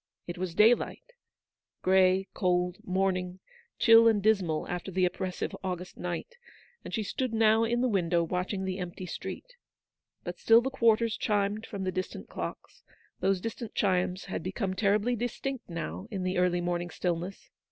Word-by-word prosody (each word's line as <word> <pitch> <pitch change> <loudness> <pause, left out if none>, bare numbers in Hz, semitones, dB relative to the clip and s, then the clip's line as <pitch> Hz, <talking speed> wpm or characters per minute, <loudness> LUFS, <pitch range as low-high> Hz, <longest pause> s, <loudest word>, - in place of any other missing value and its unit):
It 175 0 -6
was 180 -2 -3
daylight,— 240 - +3 0.7
grey, 190 0 +4
cold, 180 -1 +1
morning, 185 -1 -1 0.4
chill 230 0 +7
and 220 -2 +4
dismal 195 -7 +1
after 180 +2 -4
the 185 0 +2
oppressive 180 0 -3
August 180 -1 -4
night, 180 - -5 0.5
and - - -8
she 220 - -1
stood 240 +3 -2
now 220 0 +4
in 240 +1 0
the 255 - +3
window 175 -6 +2
watching 180 +3 -2
the 190 0 -3
empty 180 0 -5
street. - - -7 0.7
But - - -6
still 225 0 +6
the 265 +3 -2
quarters 230 -3 +3
chimed 210 +1 0
from 195 -2 -5
the 185 - -1
distant 185 0 -5
clocks: - - -7 0.4
those 190 0 +2
distant 230 +2 -6
chimes 185 -1 +1
had 195 - -4
become 190 +2 -2
terribly 210 +5 +2
distinct 245 +2 -4
now 170 +4 -5
in 195 -4 -4
the 185 0 0
early 180 -1 +2
morning 175 0 -2
stillness. 175 +2 -4
190 Hz, 160 wpm, -29 LUFS, 180-220 Hz, 0.7 s, chill